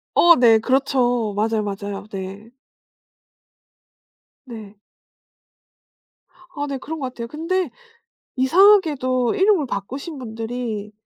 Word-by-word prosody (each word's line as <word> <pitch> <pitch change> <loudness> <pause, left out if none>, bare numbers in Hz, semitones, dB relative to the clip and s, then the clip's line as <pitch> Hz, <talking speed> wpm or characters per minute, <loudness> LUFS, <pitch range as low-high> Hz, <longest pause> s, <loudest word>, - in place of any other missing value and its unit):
어 345 -1 +7
네. 230 -3 +5
그렇죠. 245 -3 0
맞아요, 215 0 0
맞아요. 200 0 -6
네. 195 +3 -7 2.0
네. 215 -4 -11 1.8
아 290 0 -3
네. 275 -1 -4
그런 315 +4 -7
것 260 - -3
같아요. 235 -2 -7
근데 335 +7 -2 0.7
이상하게도 265 - +3
이름을 380 -7 +2
바꾸신 270 - -6
분들이 225 -2 -5
250 Hz, 200 characters per minute, -21 LUFS, 215-290 Hz, 2.0 s, 어